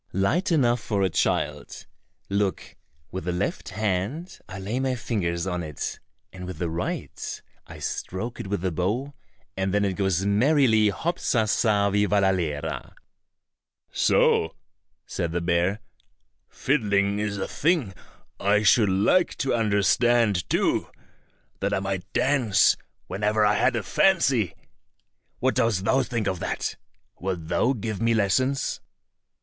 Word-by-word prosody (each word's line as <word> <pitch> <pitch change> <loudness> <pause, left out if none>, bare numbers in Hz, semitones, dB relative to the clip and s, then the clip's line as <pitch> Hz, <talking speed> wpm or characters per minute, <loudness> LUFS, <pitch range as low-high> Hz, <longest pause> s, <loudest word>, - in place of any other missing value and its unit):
"Light 155 - +1
enough 125 -6 +3
for 100 -4 -1
a 95 - +1
child. - - -1 0.4
Look, 100 -1 -2 0.4
with 95 -2 -5
the 90 - 0
left 90 +3 -3
hand 110 - -3
I 95 - -7
lay 100 +6 -3
my 130 -1 0
fingers 90 -8 -2
on 90 -2 -2
it, 75 -4 -5 0.3
and 90 -1 -8
with 90 -3 -6
the 85 0 -2
right 85 +2 -4 0.3
I - - -10
stroke 115 +6 -4
it - - -5
with 100 -2 -2
the 95 0 -1
bow, 105 - -2 0.4
and 95 0 -1
then 100 +1 +2
it 95 - 0
goes 95 -1 0
merrily, 110 0 +4
hop 170 - -2
sa 115 -3 +1
sa 105 -2 +2
vivallalera!" 95 -7 0 1.0
"So," 80 0 +2 0.5
said 85 -3 -3
the 85 - 0
bear; 85 +4 0 0.7
"fiddling 100 -7 +1
is 105 -1 -2
a 95 - -3
thing 150 - 0 0.5
I 105 +2 +2
should 105 0 +5
like 105 - +2
to 135 - 0
understand 105 -1 +2
too, - - +1 0.7
that 100 +1 0
I - - 0
might 95 -1 -4
dance 125 -9 +3 0.3
whenever 105 +1 +1
I 105 - +4
had 105 - +2
a 115 - -1
fancy. 130 - +2 0.8
What 130 +1 +1
dost 115 -6 +1
thou 135 +5 +3
think 120 -3 -2
of 95 -3 -1
that? - - -3 0.4
Wilt 90 -3 -4
thou 120 +8 +2
give 110 -3 -4
me 115 0 +2
lessons?" 130 +7 +1
100 Hz, 140 wpm, -25 LUFS, 95-120 Hz, 1.0 s, should